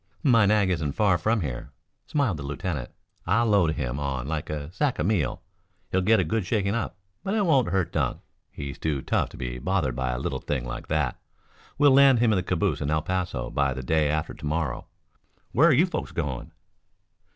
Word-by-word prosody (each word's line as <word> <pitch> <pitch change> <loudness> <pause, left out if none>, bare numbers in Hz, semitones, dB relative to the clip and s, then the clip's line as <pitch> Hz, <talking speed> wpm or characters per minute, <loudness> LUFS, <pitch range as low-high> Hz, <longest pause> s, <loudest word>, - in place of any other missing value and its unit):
"My 115 -8 +5
nag 100 -2 +3
isn't 80 -5 -1
far 95 -3 +2
from 110 +5 +1
here," 65 -7 -4 0.4
smiled 130 - 0
the - - -7
lieutenant. 75 -2 -4 0.4
"I'll 115 +2 +3
load 100 -8 +3
him 65 -2 -3
on 70 -3 -3
like 80 -1 -3
a 75 0 -4
sack 130 +8 0
of 75 - -1
meal. 90 - 0 0.5
He'll 95 - +2
get 110 +4 +4
a - - +3
good 100 +6 -1
shaking 100 +1 0
up, 115 -4 -3 0.3
but 195 +2 -1
it 210 -2 +2
won't 140 -8 +3
hurt 95 -3 0
Dunk. 70 -6 -1 0.3
He's 70 -2 -7
too 75 -4 -1
tough - - 0
to - - -12
be 60 0 -4
bothered 75 -4 0
by 65 0 -1
a - - -2
little - - -3
thing 65 -4 -3
like - - -6
that. 75 -5 -1 0.6
We'll 145 -1 +6
land 135 -1 +7
him 115 -1 +3
in - - +2
the - - +1
calaboose 90 -2 0
in 70 - -1
El 75 0 +1
Paso 90 -8 -2
by 70 -2 +1
the 65 - -5
day 75 +2 +2
after 75 +1 -1
to - - -14
morrow. 75 -3 -2 0.6
Where 160 +8 +5
are - - +6
you 150 +6 +5
folks 180 - -4
going?" 75 -7 -4
85 Hz, 210 wpm, -26 LUFS, 70-110 Hz, 0.6 s, land